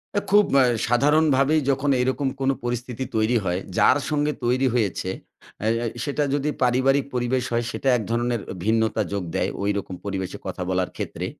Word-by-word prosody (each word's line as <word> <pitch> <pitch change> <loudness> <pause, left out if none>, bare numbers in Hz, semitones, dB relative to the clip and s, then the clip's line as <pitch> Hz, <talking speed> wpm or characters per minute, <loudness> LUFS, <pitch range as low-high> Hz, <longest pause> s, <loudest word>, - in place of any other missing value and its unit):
অ্যা 205 - +1
খুব 205 0 +6 0.2
আ - - +6 0.2
সাধারণভাবেই 145 +3 +3
যখন 140 +1 +1
এরকম 130 +2 0
কোন 135 0 +1
পরিস্থিতি 120 +1 -3
তৈরি 110 +2 +2
হয়, 90 0 0 0.2
যার - - +5
সঙ্গে 150 0 +1
তৈরি 130 +2 +2
হয়েছে 105 -6 0 0.5
আ - - -1 0.2
আ - - -1 0.2
সেটা 145 0 -1
যদি 145 +1 0
পারিবারিক 130 +3 +3
পরিবেশ 125 +1 0
হয়, 120 0 +1
সেটা 135 - -1
এক 110 - -4
ধরণের 120 -1 0
অ - - -4
ভিন্নতা 110 0 +2
যোগ 100 -2 -2
দেয়। - - +1
ঐরকম 100 -2 -2
পরিবেশে 95 -2 -4
কথা 90 - -4
বলার 95 -1 0
ক্ষেত্রে। - - -4
125 Hz, 175 wpm, -23 LUFS, 110-140 Hz, 0.5 s, খুব